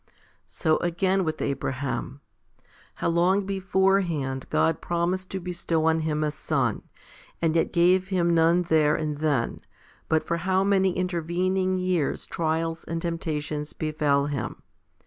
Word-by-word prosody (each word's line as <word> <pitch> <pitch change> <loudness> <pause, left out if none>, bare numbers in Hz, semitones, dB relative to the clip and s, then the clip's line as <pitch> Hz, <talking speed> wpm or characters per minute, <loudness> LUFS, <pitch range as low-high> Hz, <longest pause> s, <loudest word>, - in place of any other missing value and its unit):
5. - - -32 0.3
So 155 -1 +1
again 185 +2 +1
with 155 -2 -2
Abraham. 135 0 -3 0.7
How - - -2
long 180 +4 +2
beforehand 190 -8 0
God 160 -1 +1
promised 175 +2 -1
to 190 - -3
bestow 170 -3 -1
on 160 0 +3
him 155 -1 -1
a 150 - 0
son, - - -1 0.6
and 165 -1 +1
yet 165 - +2
gave 180 +2 +3
him 175 -3 +1
none 170 +2 +4
there 155 -3 +3
and 150 -2 -3
then, 145 -7 0 0.5
but 160 0 +2
for 170 - -1
how 185 +2 +1
many 190 -2 +3
intervening 185 +1 0
years 180 -5 0
trials 165 0 -2
and 165 0 -3
temptations 155 -3 -3
befell 150 -3 +1
him 145 -2 -4
170 Hz, 140 wpm, -26 LUFS, 155-185 Hz, 0.7 s, none